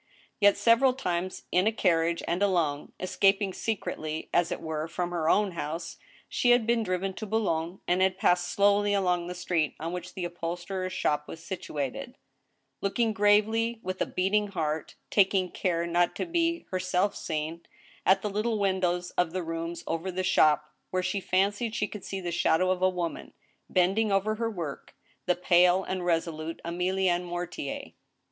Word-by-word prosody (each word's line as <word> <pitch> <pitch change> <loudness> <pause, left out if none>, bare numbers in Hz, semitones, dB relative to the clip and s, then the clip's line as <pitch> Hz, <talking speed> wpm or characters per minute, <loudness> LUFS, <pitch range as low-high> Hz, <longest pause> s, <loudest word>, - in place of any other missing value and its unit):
Yet, 205 -1 +5
several 245 +3 +4
times 180 -6 -3
in 185 +3 +3
a - - +4
carriage 170 -5 +1
and 175 +3 -1
alone, 170 -8 +1
escaping 195 +1 +2
secretly, 160 -8 -3
as 175 -1 +2
it - - -2
were, 160 -1 -3
from 175 +1 -3
her 165 -2 0
own 205 +1 +3
house, 165 0 -5 0.3
she 245 - +1
had 245 -2 +5
been 235 0 +2
driven 190 -1 -1
to 215 +3 -6
Boulogne, 185 -5 -1
and 180 +1 +2
had 190 0 +2
passed 175 -1 +2
slowly 205 +2 +3
along 180 -3 +1
the 180 - -5
street 175 -4 -1
on 165 +2 -4
which 180 0 -6
the 180 - -3
upholsterer's 175 +2 -4
shop 150 -4 0
was 165 - -9
situated; 165 - -5 0.6
looking 220 +3 +1
gravely, 220 +3 +3
with 185 0 -4
a - - +1
beating 205 +3 +1
heart 160 -5 -3 0.2
(taking 190 -2 +3
care 170 -2 0
not 175 0 +1
to - - -2
be 335 -1 0
herself 185 +2 0
seen), 160 +1 -3 0.4
at 190 +1 +4
the 210 - -1
little 215 +2 0
windows 185 -3 0
of 175 -2 0
the 185 -1 -2
rooms 165 +1 -4
over 165 +3 -2
the 185 +1 -2
shop, 150 -3 +3 0.2
where 185 0 -1
she 200 - -1
fancied 205 +5 0
she 210 -2 0
could 210 -2 -9
see 195 - -4
the 175 -2 -4
shadow 175 +2 +2
of 185 -1 -1
a 185 - +5
woman, 175 -2 -4 0.4
bending 195 +4 +2
over 195 +2 +2
her 225 +1 -2
work— 170 -9 -6 0.3
the 180 - +3
pale 180 +1 +4
and 185 -1 -3
resolute 165 -1 -1
Emilienne 180 +1 +1
Mortier. 175 -5 -5
185 Hz, 170 wpm, -28 LUFS, 170-200 Hz, 0.6 s, Yet